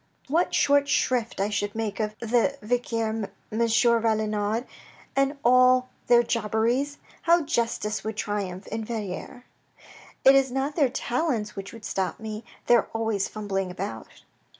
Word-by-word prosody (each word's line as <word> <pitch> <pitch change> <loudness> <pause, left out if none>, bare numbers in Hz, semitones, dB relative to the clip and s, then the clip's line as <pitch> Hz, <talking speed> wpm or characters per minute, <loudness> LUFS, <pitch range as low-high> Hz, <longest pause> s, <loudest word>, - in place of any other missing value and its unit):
What 335 +5 +1
short 285 0 +3
shrift 240 -5 +1
I 200 +1 +1
should 205 0 -2
make 215 -3 -3
of 215 -1 -2
the 240 +4 +1
vicaire, 230 -1 0 0.4
M. 220 - -3
Valenod 225 -1 +2 0.5
and 275 +1 +1
all 255 +1 +5 0.2
their 240 0 +6
jobberies! 235 +5 0 0.2
How 340 0 +4
justice 230 -6 -1
would 220 -1 -4
triumph 195 -2 -3
in 220 +1 -3
Verrieres. 215 +1 -5 0.8
It 270 - +9
is 270 -1 +3
not 270 +3 -1
their 285 -6 +3
talents 245 -4 -1
which 195 0 -7
would 230 -2 -11
stop 190 -1 -2
me. 220 0 -6 0.2
They 240 - +6
are 225 - -1
always 220 -3 0
fumbling 195 -3 -3
about." 115 -11 -7
225 Hz, 145 wpm, -26 LUFS, 210-255 Hz, 0.8 s, It